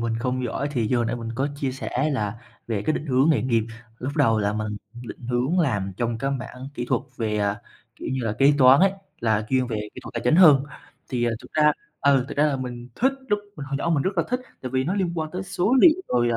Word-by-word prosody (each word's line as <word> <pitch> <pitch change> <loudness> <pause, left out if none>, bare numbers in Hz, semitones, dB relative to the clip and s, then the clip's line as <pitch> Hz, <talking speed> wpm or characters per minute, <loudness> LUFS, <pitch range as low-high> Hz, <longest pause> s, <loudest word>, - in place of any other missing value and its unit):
mình 115 -1 -1
không 125 +1 -1
giỏi 135 +4 -2
thì 120 -6 0
như 125 - +2
hồi 120 -1 +1
nãy 120 - -2
mình 115 -1 -6
có 135 +4 0
chia 135 -2 -2
sẻ 135 +2 -2
là 110 -4 -2 0.3
về 110 -3 -2
cái 155 - +1
định 155 - -3
hướng 135 +3 +3
nghề 140 -9 +2
nghiệp, 115 -3 +2 0.4
lúc 130 +3 -4
đầu 115 -7 +3
là 105 0 0
mình 105 0 -3 0.3
định 120 0 -9
hướng 130 +9 +1
làm 105 - 0
trong 115 0 -1
cái 135 +3 -1
mảng 130 0 -5
kỹ 120 - -3
thuật 130 - +1
về, 105 -2 -1
à, 100 +1 0 0.4
kiểu - - -6
như 130 - -1
là, 110 - 0
kế 140 +1 +6
toán 130 +2 +7
ấy, 195 0 +5 0.3
là 110 -2 +1
chuyên 130 -1 +2
về 115 -3 -3 0.2
kỹ - - -8
thuật - - -9
tài 120 - -2
chính 125 +6 +4
hơn. 150 -7 +7 0.4
Thì, 125 -3 -1
à, 120 - +2
thực - - -15
ra 150 -1 +4 0.3
ừ, 140 -2 +4
thực - - -7
ra 150 - +4
là 145 -2 0
mình 125 -2 -6
thích 265 +3 +2 0.2
lúc 205 - +2 0.2
mình 145 -3 -6
hồi 140 0 -2
nhỏ 170 - -1
mình 150 -4 +2
rất 190 -2 -2
là - - +4
thích, 250 +1 0 0.2
tại 130 - -4
vì 130 0 0
nó 180 - -1
liên 190 -4 0
quan 155 -2 -3
tới 185 +3 -4
số 185 +5 0
liệu, 350 +2 +6
rồi, 120 -1 +2
à 115 - +1
130 Hz, 270 wpm, -24 LUFS, 115-150 Hz, 0.4 s, toán